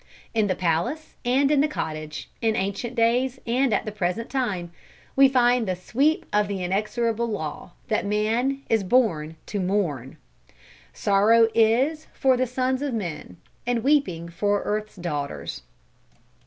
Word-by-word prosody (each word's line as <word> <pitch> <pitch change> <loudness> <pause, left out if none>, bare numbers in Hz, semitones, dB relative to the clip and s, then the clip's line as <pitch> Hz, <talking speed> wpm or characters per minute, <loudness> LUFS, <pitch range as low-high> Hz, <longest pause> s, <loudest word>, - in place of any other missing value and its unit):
In 220 -2 +2
the 185 - 0
palace 185 - -1
and 270 +4 +3
in 290 -2 +4
the 300 - +3
cottage, 155 - -5
in 225 -2 +2
ancient 200 +5 -2
days 245 +2 +2
and 250 +2 +1
at 205 - +1
the 215 - -3
present 210 +3 -2
time, 205 -11 -2 0.4
we 275 0 +7
find 245 -3 +3
the 185 - 0
sweep 275 - +1
of 210 0 +3
the 195 -2 -3
inexorable 220 +5 0
law, 165 -5 -5
that 220 - 0
man 225 +7 0
is 220 -3 +2
born 180 -8 +1
to 205 - -3
mourn. 175 - -1 0.7
"Sorrow 220 +3 +4
is 255 +8 +2
for 265 -1 +3
the 255 +1 0
sons 255 +2 -1
of 280 -4 -2
men, 165 - -5 0.3
And 240 -2 0
weeping 265 - +1
for 205 +4 0
earth's 215 0 -3
daughters." 145 - -4
220 Hz, 150 wpm, -24 LUFS, 185-250 Hz, 0.7 s, we